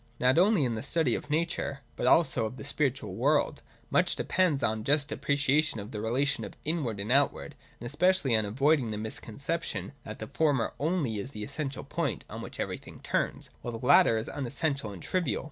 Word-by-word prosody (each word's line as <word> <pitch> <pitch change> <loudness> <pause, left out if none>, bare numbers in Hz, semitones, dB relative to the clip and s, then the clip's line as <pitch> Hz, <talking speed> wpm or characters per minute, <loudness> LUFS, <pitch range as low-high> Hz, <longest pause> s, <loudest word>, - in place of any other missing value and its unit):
Not 130 +5 +4
only 190 -5 +4
in 120 - 0
the 110 - -3
study 140 -2 +2
of - - -3
nature, 150 -3 -1
but - - -1
also 130 -9 +4
of 125 - -9
the - - -7
spiritual 140 -6 -1
world, 140 +9 +1 0.3
much - - +3
depends 165 -8 +1
on 110 -1 +1
a - - -7
just 145 +3 +2
appreciation 145 -2 +1
of 105 +3 -7
the 105 - -4
relation 130 +6 0
of - - -8
inward 145 -10 -1
and 105 +4 -3
outward, 140 +2 +2 0.3
and 120 - -8
especially 145 -1 +2
on 110 - +3
avoiding 135 +4 +2
the 105 - -3
misconception 115 +11 -4
that 110 - -7
the 110 - -5
former 140 -1 +1
only 150 - 0
is 115 - -5
the 105 -6 -7
essential 140 +4 -4
point - - -2
on - - -6
which - - -8
everjrthing - - -5
turns, - - -2
while 120 -1 -4
the 120 - -7
latter 115 -3 +6
is 110 - -3
unessential 140 -3 -2
and 95 -4 -9
trivial. 175 - 0
135 Hz, 195 wpm, -29 LUFS, 110-150 Hz, 0.3 s, latter